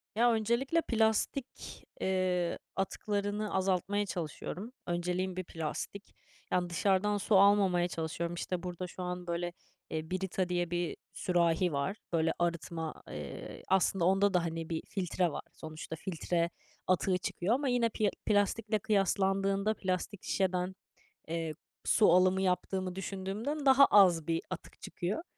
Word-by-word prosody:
Ya, 240 +1 +5
öncelikle 235 +9 +1
plastik, 225 +3 -1 0.2
eee, 185 -2 +1 0.2
atıklarını 205 +2 -2
azaltmaya 190 +2 +1
çalışıyorum. 180 - -5 0.2
Önceliğim 180 +2 -1
bir 185 - -3
plastik. 170 +4 -5 0.4
Yani, 180 -1 +1
dışarıdan 195 +3 +2
su 205 +1 +1
almamaya 195 -3 +5
çalışıyorum. 170 +1 -3
İşte, 175 +1 -3
burada 180 0 -4
şu 180 +1 -7
an 180 0 -4
böyle, 170 0 -2 0.4
eee, 160 +1 -4
"Brita" 185 -1 -1
diye 175 -1 0
bir 175 -1 -1 0.2
sürahi 175 0 +2
var. 140 +9 -1 0.2
Böyle 165 0 +3
arıtma, 170 -2 -2 0.2
eee, 75 -1 -7
aslında 190 -1 +2
onda 195 +2 +4
da, 180 - +3
hani, 165 0 -4
bir 160 -1 -2
filtre 180 -2 0
var. - - -5
Sonuçta 155 0 -7
filtre 170 0 -1 0.4
atığı 185 0 +2
çıkıyor 180 +3 -1
ama 280 +1 -1
yine 245 -2 +2
pi 220 - -4
eee, 205 - +5 0.2
plastikle 210 +1 +2
kıyaslandığında, 195 0 +2
plastik 185 0 -3
şişeden, 185 -1 0 0.5
eee, 165 -1 -2 0.3
su 215 - +5
alımı 185 +1 +4
yaptığımı 185 0 0
düşündüğümden 200 +10 -3
daha 270 +1 +8
az 180 - +5
bir 165 0 +1
atık 185 - -8
çıkıyor. 190 - -3
185 Hz, 135 wpm, -32 LUFS, 175-205 Hz, 0.5 s, daha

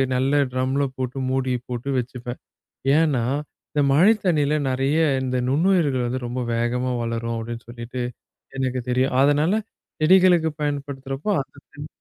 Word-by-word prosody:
நல்ல 130 +2 +1 0.2
ட்ரம்ல 130 +2 0
போட்டு 130 0 -4
மூடி 130 -1 0 0.2
போட்டு 125 +2 -4
வச்சுப்பேன். 125 0 -6 0.6
ஏன்னா 150 -7 +2 0.5
இந்த 150 - +1
மழைத் 195 +10 +5
தண்ணியில 150 -4 +2
நறைய 135 +4 +1 0.2
இந்த 130 0 -1
நுண்ணுயிர்கள் 145 -3 +2
வந்து 130 +2 -2
ரொம்ப 125 +1 -3
வேகமா 120 +2 0
வளரும் 115 0 -2
அப்டின்னு 115 +1 -6
சொல்லிட்டு 120 +1 -6 0.6
,எனக்குத் 130 -2 -2
தெரியும். 125 +1 +1
அதனால 150 +9 +3 0.4
செடிகளுக்கு 175 -1 +5
பயன்படுத்துறப்போ 140 +1 -3
அந்த 135 - -13
தண்ணி 145 +1 -8
130 Hz, 130 wpm, -23 LUFS, 125-150 Hz, 0.6 s, மழைத்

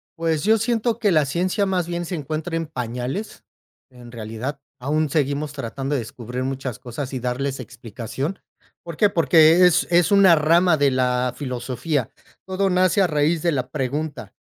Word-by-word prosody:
Pues, 165 -3 -1
yo 220 +2 +4
siento 225 +1 0
que 210 -4 +2
la 155 -3 +3
ciencia 185 +7 0
más 180 -3 0
bien 175 0 -3
se 175 - -4
encuentra 155 +2 -4
en 165 0 -1
pañales, 125 - -5 0.5
en 120 -2 -13
realidad, 115 +5 -5 0.2
aún 150 +4 0
seguimos 145 0 -1
tratando 135 +1 -4
de 140 - +1
descubrir 120 +2 -6
muchas 130 -2 -4
cosas 125 +3 -6
y 130 - -2
darles 130 +2 -2
explicación, 125 - -6 0.4
¿por 170 -2 -8
qué? 210 - +4
Porque 165 +1 +5
es 175 - +2
es 175 +2 +4
una 195 -3 +7
rama 165 +3 +4
de 140 -1 +3
la 125 -1 0
filosofía. 130 0 -3 0.4
Todo 190 +1 0
nace 185 +1 +3
a - - +3
raíz 155 +1 +1
de 170 - +2
la 130 -4 -2
pregunta 145 +3 -4
150 Hz, 170 wpm, -22 LUFS, 130-175 Hz, 0.5 s, una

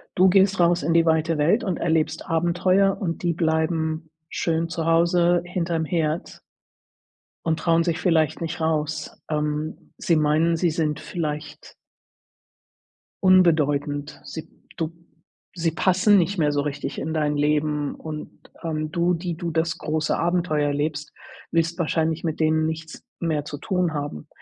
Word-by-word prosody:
Du 185 +1 +5
gehst 195 +1 +4
raus 175 -1 +3
in 165 +3 +1
die 165 0 +4
weite 160 0 +2
Welt 175 +12 +3
und 185 -5 -1
erlebst 160 -2 0
Abenteuer 180 +4 +2
und 170 -4 -3
die 175 -1 +1
bleiben 160 -1 0 0.2
schön 165 0 -1
zu 165 -1 -3
Hause 170 +1 +3
hinter'm 170 -2 -1
Herd 160 0 -2 1.1
und 160 -1 +1
trauen 165 -1 +3
sich 165 -1 -1
vielleicht 165 -4 +1
nicht 165 0 -4
raus. 155 -1 -1 0.2
Ähm, 150 0 -3
sie 170 - +1
meinen 155 +2 +2
sie 175 +1 +2
sind 155 -2 -1
vielleicht 150 -1 -5 1.5
unbedeutend. 150 -6 +3
Sie 160 - -7 0.3
du 160 -1 -2 0.6
sie 170 -2 0
passen 185 +5 +4
nicht 190 +2 +1
mehr 150 -2 +3
so 145 0 +1
richtig 145 0 -4
in 160 - -3
dein 150 -2 0
Leben 150 0 0
und, 155 -1 -7 0.3
ähm, 155 -2 -2
du, 170 +2 +2
die 175 0 -3
du 170 +1 -4
das 165 0 0
große 155 -1 -1
Abenteuer 170 -4 +1
erlebst, 145 +1 -2 0.4
willst 165 +1 +1
wahrscheinlich 160 -1 0
mit 160 -2 -2
denen 155 0 +2
nichts 160 0 -5 0.2
mehr 155 -3 -1
zu 145 - -6
tun 180 +1 -1
haben. 145 - -5
160 Hz, 145 wpm, -24 LUFS, 155-170 Hz, 1.5 s, Du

